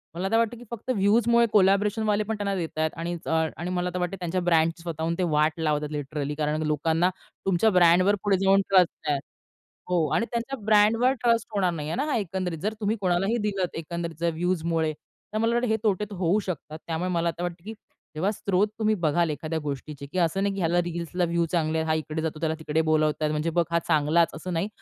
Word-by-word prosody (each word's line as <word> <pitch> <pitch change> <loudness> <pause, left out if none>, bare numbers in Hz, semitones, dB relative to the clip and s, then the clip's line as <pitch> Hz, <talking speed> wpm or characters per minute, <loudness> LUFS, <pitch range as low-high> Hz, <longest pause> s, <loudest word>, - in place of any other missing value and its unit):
मला 190 +3 -2
तर 225 - +4
वाटतं 230 0 +1
की 240 - -12
फक्त 235 +2 -8
व्ह्यूजमुळे 235 +4 +4
कोलॅबोरेशनवाले 210 +2 +3
पण 220 +1 -3
त्यांना 200 -1 -1
देतायेत 160 -3 -2
आणि 170 +1 -3
अ, - - -4 0.3
आणि 170 +2 -4
मला 180 0 -1
तर 180 - -2
वाटते 180 +2 -2
त्यांच्या 180 +1 -2
ब्रँडची 165 -1 +2
स्वतःहून 165 0 -2
ते 185 - 0
वाट 155 +2 +2
लावतात 150 -2 0
लिटरली. 145 0 -3
कारण 155 +1 -1
लोकांना 165 +3 +2 0.4
तुमच्या 195 +3 +3
ब्रँडवर 185 +1 +5
पुढे 200 -2 +3
जाऊन 195 +1 +5
ट्रस्ट 180 -5 +3
आहे. 145 - +1 0.7
हो 170 -3 +2
आणि 230 - +1
त्यांच्या 235 +4 -2
ब्रँडवर 220 +4 +4
ट्रस्ट 230 -2 +2
होणार 185 -3 +2
नाहीये 155 -1 -4
ना 275 +5 0
हां 295 - 0
एकंदरीत. 185 -3 -3
जर 210 +7 -2
तुम्ही 215 +2 0
कोणालाही 190 +4 +1
दिलतं 195 -5 -2
एकंदरीत 170 0 -5
जर 170 - +2
व्ह्यूजमुळे. 165 -2 0 0.4
तर 215 - -1
मला 230 +1 +1
वाटतं 240 +1 +1
हे 220 - +2
तोटे 210 -1 +1
तर - - -6
होऊ 180 +3 +2
शकतात. 155 -3 -5
त्यामुळे 170 +2 -2
मला 170 -1 +1
आता 170 +1 -4
वाटतं 175 -1 -4
की 220 - -6 0.4
जेव्हा 175 +6 0
स्रोत 200 0 +1
तुम्ही 215 -1 +2
बघाल 165 +2 +2
एखाद्या 155 +2 -3
गोष्टीची 140 0 -6
की 185 - -2
असं 175 +3 +1
नाही 200 0 0
की 195 - -4
ह्याला 175 +1 +2
रील्सला 175 +1 -2
व्ह्यू 170 0 +1
चांगले 160 -2 +1
आहेत. 160 0 -1
हा 155 - +3
इकडे 155 0 -3
जातो 155 -1 -3
त्याला 160 -1 0
तिकडे 160 0 -1
बोलावतायत 155 0 +2
म्हणजे 155 +2 -1
बघ 170 - +4
हा 170 - +2
चांगलाच 160 +2 +3
असं 175 +3 -6
नाही. 170 +5 -1
175 Hz, 215 wpm, -26 LUFS, 160-200 Hz, 0.7 s, ब्रँडवर